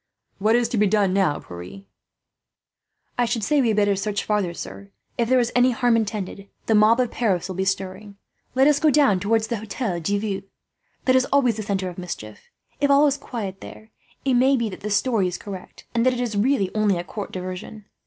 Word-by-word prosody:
"What 215 Hz, +3 st, +3 dB
is 240 Hz, -1 st, +2 dB
to 235 Hz, -, -1 dB
be 210 Hz, -, +4 dB
done 200 Hz, -2 st, +2 dB
now, 190 Hz, -6 st, +2 dB
Pierre?" 90 Hz, +3 st, -10 dB, 1.4 s
"I 245 Hz, -, +4 dB
should 230 Hz, -2 st, -2 dB
say 295 Hz, +3 st, +3 dB
we 245 Hz, -, +2 dB
had 215 Hz, -2 st, +1 dB
better 205 Hz, -1 st, +3 dB
search 200 Hz, +1 st, -2 dB
farther, 210 Hz, -4 st, 0 dB
sir. 200 Hz, +3 st, -9 dB, 0.3 s
If 235 Hz, -1 st, 0 dB
there 255 Hz, 0 st, +5 dB
is 240 Hz, -1 st, 0 dB
any 250 Hz, +1 st, +5 dB
harm 245 Hz, -1 st, +2 dB
intended, 205 Hz, -3 st, -3 dB, 0.2 s
the 225 Hz, -, +2 dB
mob 215 Hz, +3 st, +5 dB
of 250 Hz, -2 st, +1 dB
Paris 190 Hz, -8 st, 0 dB
will 185 Hz, -, -6 dB
be 190 Hz, +1 st, -1 dB
stirring. 195 Hz, +1 st, -3 dB, 0.4 s
Let 265 Hz, +1 st, +5 dB
us 295 Hz, -1 st, +4 dB
go 310 Hz, -, +4 dB
down 280 Hz, -10 st, +4 dB
towards 220 Hz, +3 st, +1 dB
the 235 Hz, -, -1 dB
Hotel 210 Hz, -3 st, -3 dB
de 200 Hz, +5 st, 0 dB
Ville; 200 Hz, -2 st, -3 dB, 0.6 s
that 255 Hz, -, +4 dB
is 260 Hz, 0 st, +4 dB
always 255 Hz, -5 st, +2 dB
the -, -, -3 dB
centre 195 Hz, -2 st, -2 dB
of 180 Hz, 0 st, -7 dB
mischief. 110 Hz, -12 st, -8 dB, 0.3 s
If 285 Hz, -, +2 dB
all 280 Hz, +1 st, +6 dB
is 285 Hz, -2 st, +3 dB
quiet 215 Hz, -9 st, -6 dB
there, 220 Hz, 0 st, -12 dB, 0.3 s
it 265 Hz, -, +2 dB
may 260 Hz, +2 st, +4 dB
be 230 Hz, -2 st, -1 dB
that 185 Hz, -, -9 dB
this 210 Hz, 0 st, -1 dB
story 225 Hz, -8 st, +1 dB
is 180 Hz, -, -4 dB
correct, 195 Hz, -3 st, -10 dB
and 230 Hz, -1 st, +2 dB
that 255 Hz, +1 st, +3 dB
it 245 Hz, -, -4 dB
is 240 Hz, -3 st, -2 dB
really 205 Hz, -2 st, +1 dB
only 210 Hz, -3 st, +2 dB
a 175 Hz, -, -3 dB
court 205 Hz, +3 st, -7 dB
diversion. 185 Hz, +3 st, -7 dB
215 Hz, 225 wpm, -23 LUFS, 195-245 Hz, 1.4 s, all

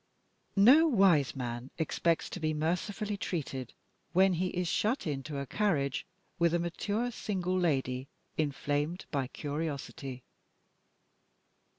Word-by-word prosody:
No 260 Hz, +11 st, +7 dB
wise 190 Hz, -, +4 dB
man 120 Hz, 0 st, -4 dB
expects 165 Hz, +1 st, +1 dB
to -, -, -5 dB
be 155 Hz, -1 st, 0 dB
mercifully 200 Hz, +6 st, -1 dB
treated, 135 Hz, -, -4 dB, 0.4 s
when 190 Hz, +1 st, +5 dB
he 180 Hz, +2 st, 0 dB
is 180 Hz, -1 st, -2 dB
shut 220 Hz, +10 st, +1 dB
into 145 Hz, -1 st, -3 dB
a 140 Hz, -, -2 dB
carriage 145 Hz, -7 st, 0 dB, 0.3 s
with 170 Hz, 0 st, +4 dB
a -, -, +4 dB
mature 205 Hz, +8 st, -1 dB
single 185 Hz, -5 st, -2 dB
lady, 135 Hz, -7 st, 0 dB, 0.3 s
inflamed 145 Hz, +3 st, -1 dB
by 140 Hz, -4 st, 0 dB
curiosity. 140 Hz, -3 st, -4 dB
165 Hz, 115 wpm, -31 LUFS, 140-190 Hz, 0.4 s, No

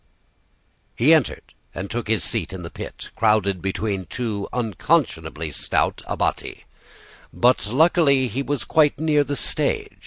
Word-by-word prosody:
"He 140 Hz, +8 st, +5 dB
entered 155 Hz, -7 st, 0 dB, 0.2 s
and 95 Hz, +3 st, -4 dB
took 115 Hz, +1 st, -4 dB
a 110 Hz, -2 st, +2 dB
seat 95 Hz, -6 st, -2 dB
in 90 Hz, -1 st, -7 dB
the 85 Hz, -, -8 dB
pit, -, -, -8 dB
crowded 105 Hz, -4 st, +2 dB
between 95 Hz, 0 st, -2 dB
two 110 Hz, -5 st, -3 dB
unconscionably 95 Hz, -, -1 dB
stout -, -, 0 dB
abbati; -, -, -2 dB, 0.7 s
but 120 Hz, -2 st, +2 dB
luckily 140 Hz, 0 st, +3 dB
he 125 Hz, +4 st, -3 dB
was 145 Hz, -1 st, -2 dB
quite 150 Hz, -3 st, +2 dB
near 150 Hz, -2 st, +3 dB
the 145 Hz, 0 st, -3 dB
stage. -, -, -1 dB
115 Hz, 135 wpm, -22 LUFS, 100-145 Hz, 0.7 s, He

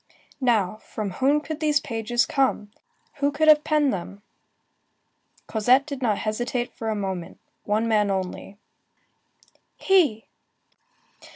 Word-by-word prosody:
Now, 220 Hz, -7 st, +1 dB
from 215 Hz, -2 st, -6 dB
whom 275 Hz, +9 st, +2 dB
could 315 Hz, 0 st, -6 dB
these 300 Hz, -2 st, +2 dB
pages 235 Hz, -1 st, -1 dB
come? 265 Hz, -7 st, 0 dB, 0.5 s
Who 285 Hz, 0 st, +1 dB
could 310 Hz, +2 st, 0 dB
have 300 Hz, -1 st, +7 dB
penned 300 Hz, -3 st, +2 dB
them? 195 Hz, +2 st, -7 dB, 1.2 s
Cosette 245 Hz, +5 st, +3 dB
did 280 Hz, -3 st, -6 dB
not 215 Hz, -5 st, +1 dB
hesitate 240 Hz, +3 st, -2 dB
a 220 Hz, -1 st, -1 dB
moment. 190 Hz, -4 st, -5 dB, 0.3 s
One 215 Hz, +2 st, 0 dB
man 210 Hz, -2 st, +2 dB
only. 190 Hz, +1 st, -4 dB, 1.2 s
He! 325 Hz, -, +2 dB
235 Hz, 115 wpm, -24 LUFS, 210-285 Hz, 1.2 s, have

